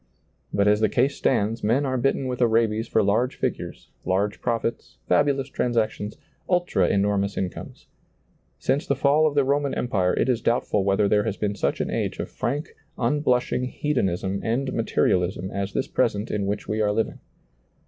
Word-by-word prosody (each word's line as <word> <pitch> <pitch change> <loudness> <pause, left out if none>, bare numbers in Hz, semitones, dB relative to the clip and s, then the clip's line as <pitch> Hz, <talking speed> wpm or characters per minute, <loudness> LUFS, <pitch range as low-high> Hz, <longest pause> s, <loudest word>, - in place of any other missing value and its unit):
But 100 0 +2
as 105 0 +4
the 110 -1 +3
case 130 +6 +1
stands 115 -2 0
men 120 +7 +2
are 130 -1 -1
bitten 135 +1 +1
with 125 -1 -3
a 120 - +5
rabies 110 0 +1
for 110 - +2
large 110 +6 +1
figures, - - -4
large 100 +3 0
profits, 115 -1 -2
fabu 145 -1 +3
lous 135 -1 -3
transactions, 110 -5 -1 0.3
ultra 175 - +2
enormous 100 0 +1
incomes. 95 -2 -5 0.7
Since 135 +3 -1
the 140 - +2
fall 145 +3 +3
of 150 - -2
the 140 - +4
Roman 140 +1 0
empire 95 -7 0
it - - +1
is 125 -3 +1
doubtful 115 -4 +1
whether 100 +1 +2
there 105 +1 +2
has 105 -3 -2
been 105 -1 -1
such 100 - -1
an - - -2
age - - -2
of - - -5
frank, 145 +5 -2 0.3
unblushing 125 -4 +1
hedonism 100 -9 -1
and 130 +4 -1
materialism 95 -4 0
as 100 0 -3
this 135 - -1
present 110 -3 0
in 100 -2 -1
which 105 +1 -3
we 110 +1 -1
are 105 -1 +2
living. 110 +2 -1
115 Hz, 180 wpm, -24 LUFS, 100-130 Hz, 0.7 s, a